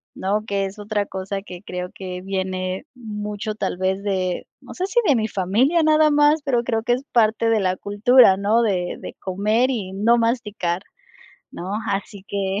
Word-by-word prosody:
¿no?, 205 +3 -1
que 200 -2 -1
es 195 +2 -7
otra 205 0 -1
cosa 195 +1 -4
que 180 -3 -10
creo 180 -2 -5
que 180 -1 -6
viene 185 +1 -3
mucho 210 -2 -5
tal 195 -4 -2
vez 190 +2 -1
de, 185 -3 -1 0.2
no - - -11
sé 365 - -1
si 480 +5 +2
de 285 - +5
mi 220 -1 0
familia 225 - +2
nada 310 0 +4
más, 295 +1 +4
pero 250 -5 +1
creo 225 -2 -1
que 240 - +2
es 255 +3 -2
parte 225 -1 +3
de 225 -2 +3
la 185 -1 0
cultura, 205 0 +5
¿no?, 210 +4 +2
de 185 -6 0
de - - -8
comer 215 +7 +1
y 205 -7 -3
no 220 +5 +3
masticar, 215 -6 -1 0.7
¿no?, 185 +3 -6 0.2
así 200 0 -4
que. 195 0 -1
205 Hz, 185 wpm, -22 LUFS, 190-235 Hz, 0.7 s, de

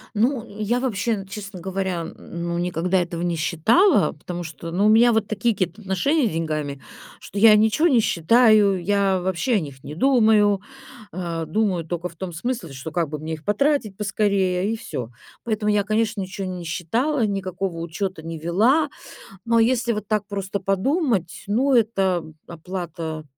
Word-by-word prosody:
Ну, 235 +2 +1 0.2
я 235 +4 0
вообще, 220 -4 -1
честно 195 -1 -8
говоря, 190 -1 -2
н 165 - -8
ну, 170 0 -5
никогда 180 +1 0
этого 170 -1 -4
не 175 -1 0
считала, 185 - +3
потому 175 -1 -6
что, 165 +1 -8
ну, 195 +4 +1
у - - +5
меня 235 +2 +6
вот 220 -2 +1
такие 230 +1 0
какие-то 185 +2 -3
отношения 230 - +1
с - - -3
деньгами, 155 -4 -3 0.4
что 200 - -10
я 215 0 +8
ничего 220 +10 +3
не 255 -7 +4
считаю, 210 0 +4
я 195 -1 +2
вообще 190 +7 0
о - - +3
них 140 -4 -8
не 150 - -7
думаю. 215 -4 +4 0.5
А, 170 -2 -4
думаю 180 -1 0
только 175 +1 -4
в 170 - -17
том 180 -1 -6
смысле, 230 - -3 0.2
как 170 -4 0
бы 150 -1 -5
мне 160 +1 -5
их 155 -1 -7
потратить 215 -1 +1
поскорее, 195 -1 0
и - - -3
всё. 120 - -6 0.3
Поэтому 215 -2 0
я, 205 -1 +2
конечно, 215 0 0
ничего 190 +1 -5
не 180 -1 -5
считала, 225 - 0
никакого 190 -3 -3
учёта 170 +1 -4
не 165 -1 -6
вела. 230 - +2 0.6
Но 230 0 +3
если 235 0 +2
вот 210 -1 -5
так 210 -1 -1
просто 200 -1 -3
подумать, 195 - 0
ну, 260 +7 +2
это 195 -7 +2 0.2
оплата 165 -2 -6
195 Hz, 170 wpm, -23 LUFS, 170-220 Hz, 0.6 s, я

